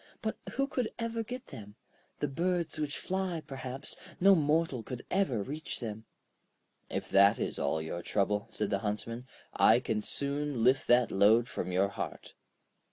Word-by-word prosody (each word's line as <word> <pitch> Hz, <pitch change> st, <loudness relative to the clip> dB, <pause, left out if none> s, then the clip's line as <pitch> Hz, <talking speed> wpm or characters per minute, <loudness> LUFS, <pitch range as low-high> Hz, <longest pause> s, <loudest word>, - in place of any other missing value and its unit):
But -, -, -1 dB, 0.2 s
who 275 Hz, -, +1 dB
could 255 Hz, -4 st, -1 dB
ever 230 Hz, -1 st, -2 dB
get 250 Hz, +3 st, -6 dB
them? 105 Hz, -1 st, -10 dB, 0.5 s
The 145 Hz, -, +2 dB
birds 170 Hz, +4 st, -1 dB
which 150 Hz, -1 st, -2 dB
fly, 185 Hz, -4 st, -2 dB
perhaps; 135 Hz, +1 st, -5 dB, 0.2 s
no 195 Hz, +2 st, +7 dB
mortal 155 Hz, -5 st, +2 dB
could 125 Hz, +2 st, -7 dB
ever 140 Hz, -, +1 dB
reach 150 Hz, +7 st, -5 dB
them.' 110 Hz, -2 st, -5 dB, 0.8 s
'If -, -, -3 dB
that 100 Hz, +2 st, +6 dB
is -, -, -3 dB
all 80 Hz, -, +1 dB
your 85 Hz, +2 st, -4 dB
trouble,' 105 Hz, +2 st, 0 dB
said 105 Hz, -, -2 dB
the 100 Hz, -, +1 dB
Huntsman, 115 Hz, +4 st, -3 dB, 0.3 s
'I 115 Hz, +2 st, +6 dB
can 110 Hz, -3 st, -1 dB
soon 140 Hz, -1 st, -2 dB
lift 130 Hz, +2 st, +4 dB
that 120 Hz, 0 st, +5 dB
load 110 Hz, +5 st, +5 dB
from 90 Hz, -, -4 dB
your 95 Hz, +2 st, +2 dB
heart.' -, -, -6 dB
130 Hz, 165 wpm, -31 LUFS, 105-165 Hz, 0.8 s, no